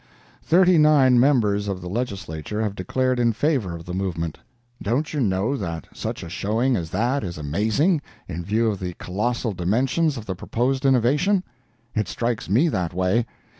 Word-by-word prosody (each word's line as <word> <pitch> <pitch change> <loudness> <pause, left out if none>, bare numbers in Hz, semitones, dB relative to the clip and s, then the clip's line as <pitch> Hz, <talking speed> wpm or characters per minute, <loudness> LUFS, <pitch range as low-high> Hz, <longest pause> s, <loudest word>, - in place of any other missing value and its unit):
Thirty 180 0 +4
nine 140 -5 +5
members 110 -7 +3
of 95 -2 -2
the 90 - -8
Legislature 100 - -3
have 105 -2 -1
declared 130 +7 0
in 115 -1 +3
favor 115 - 0
of 85 -1 -9
the 90 - -6
movement. 85 -4 -3 0.4
Don't 130 +10 -1
you 150 - -1
know 100 +4 +1
that 85 -9 -4
such - - -5
a - - -7
showing 115 +8 0
as 85 -6 -3
that 120 +8 0
is 85 -4 -5
amazing, 110 - +1 0.3
in 85 +3 -5
view 110 +5 +1
of 100 - -5
the 90 -2 -5
colossal 110 +4 -2
dimensions 130 - +1
of 110 - -7
the 95 - -3
proposed 130 +8 -1
innovation? 145 - +3 0.5
It 105 -1 0
strikes 115 -4 -2
me 125 - +4
that 90 - -2
way. 95 +6 +1
110 Hz, 170 wpm, -23 LUFS, 95-130 Hz, 0.5 s, nine